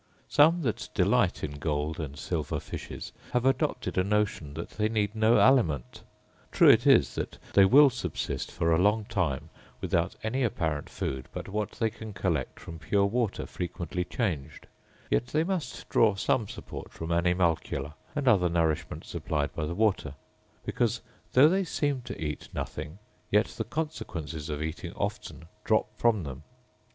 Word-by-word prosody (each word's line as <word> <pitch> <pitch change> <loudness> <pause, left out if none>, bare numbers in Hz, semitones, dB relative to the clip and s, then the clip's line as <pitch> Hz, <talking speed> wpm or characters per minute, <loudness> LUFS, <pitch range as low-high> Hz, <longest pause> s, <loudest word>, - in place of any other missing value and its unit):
Some 160 +4 +5
that 115 -5 -2
delight - - +2
in 75 -1 -4
gold 75 +1 -2
and 70 -3 -5
silver 75 -2 -2
fishes - - -7 0.2
have 125 0 +1
adopted 135 -7 +1
a - - +3
notion 100 -8 -1
that 85 - -6
they 105 0 0
need 105 -2 0
no 110 +1 +4
aliment. 85 - +3 0.5
True - - +7
it - - +3
is - - +5
that - - -4 0.2
they 100 - +7
will 140 +7 +7
subsist 120 -10 -3
for 85 0 0
a 80 +1 +4
long 105 +2 +3
time 80 -11 -2 0.3
without 90 -1 0
any 120 +5 -1
apparent 80 -10 -1
food 65 -1 -4
but - - -6
what 105 +1 -2
they 110 -1 0
can 110 -1 -9
collect 85 -9 -2
from 80 -1 -9
pure 100 +5 +2
water 115 +1 -1
frequently 90 -1 -4
changed; 85 - -3 0.5
yet 120 - +2
they 155 +4 +1
must 165 -8 -3
draw 110 -3 +4
some 110 +3 +1
support - - -8
from 80 +1 -6
animalcula, 85 -4 +1 0.2
and 145 -2 -1
other 95 -7 +5
nourishment 80 -2 -1
supplied 75 -2 -2
by 75 -1 -2
the 85 - -4
water; 100 -9 +1 0.5
because, - - 0 0.3
though 135 +4 +8
they 190 +4 +2
seem 145 -6 -1
to - - -8
eat 75 -2 -4
nothing, 75 +3 -5 0.3
yet - - +4
the - - -4
consequences 85 - -4
of 75 0 -2
eating 80 0 -5
often 80 - -4 0.2
drop 110 - +3
from 110 -4 +2
them. 70 -1 -7
90 Hz, 165 wpm, -28 LUFS, 80-115 Hz, 0.5 s, though